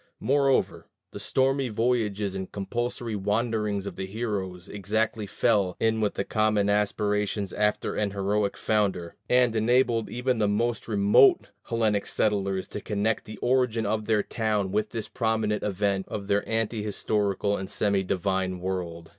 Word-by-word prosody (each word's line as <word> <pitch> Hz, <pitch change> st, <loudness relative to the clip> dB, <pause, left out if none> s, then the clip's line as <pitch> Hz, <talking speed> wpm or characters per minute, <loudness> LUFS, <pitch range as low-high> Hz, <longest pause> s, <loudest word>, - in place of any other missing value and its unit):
Moreover, 135 Hz, 0 st, +1 dB, 0.2 s
the -, -, -8 dB
stormy 135 Hz, 0 st, +1 dB
voyages 105 Hz, -3 st, 0 dB
and 95 Hz, -1 st, -5 dB
compulsory 120 Hz, +2 st, -3 dB
wanderings 105 Hz, 0 st, -1 dB
of -, -, -6 dB
the 95 Hz, -, -4 dB
heroes 95 Hz, -4 st, -4 dB
exactly 105 Hz, +2 st, -1 dB
fell 100 Hz, -4 st, +1 dB
in 110 Hz, 0 st, +1 dB
with 105 Hz, -, 0 dB
the -, -, -1 dB
common 105 Hz, -1 st, +1 dB
aspirations 105 Hz, -1 st, 0 dB
after 105 Hz, 0 st, 0 dB
an 105 Hz, -1 st, 0 dB
heroic 100 Hz, +1 st, -1 dB
founder, 95 Hz, -6 st, 0 dB, 0.2 s
and 125 Hz, -2 st, +4 dB
enabled 115 Hz, 0 st, +2 dB
even 125 Hz, 0 st, -1 dB
the 105 Hz, -, +2 dB
most 115 Hz, +3 st, 0 dB
remote 105 Hz, -, +4 dB, 0.2 s
Hellenic 110 Hz, -3 st, 0 dB
settlers 100 Hz, -3 st, 0 dB
to 105 Hz, -, -6 dB
connect 105 Hz, +1 st, -1 dB
the 110 Hz, -, -9 dB
origin 125 Hz, -3 st, +2 dB
of 105 Hz, +1 st, -1 dB
their 105 Hz, -2 st, +2 dB
town 105 Hz, -4 st, -1 dB
with 105 Hz, +1 st, 0 dB
this 110 Hz, -2 st, -5 dB
prominent 110 Hz, -2 st, 0 dB
event 100 Hz, -1 st, -1 dB
of 100 Hz, -2 st, -5 dB
their 100 Hz, +1 st, +1 dB
ante 115 Hz, -1 st, -1 dB
historical 105 Hz, -1 st, 0 dB
and 95 Hz, -1 st, -5 dB
semi 100 Hz, -2 st, +1 dB
divine 95 Hz, 0 st, -1 dB
world. 90 Hz, -3 st, -4 dB
105 Hz, 150 wpm, -26 LUFS, 100-115 Hz, 0.2 s, and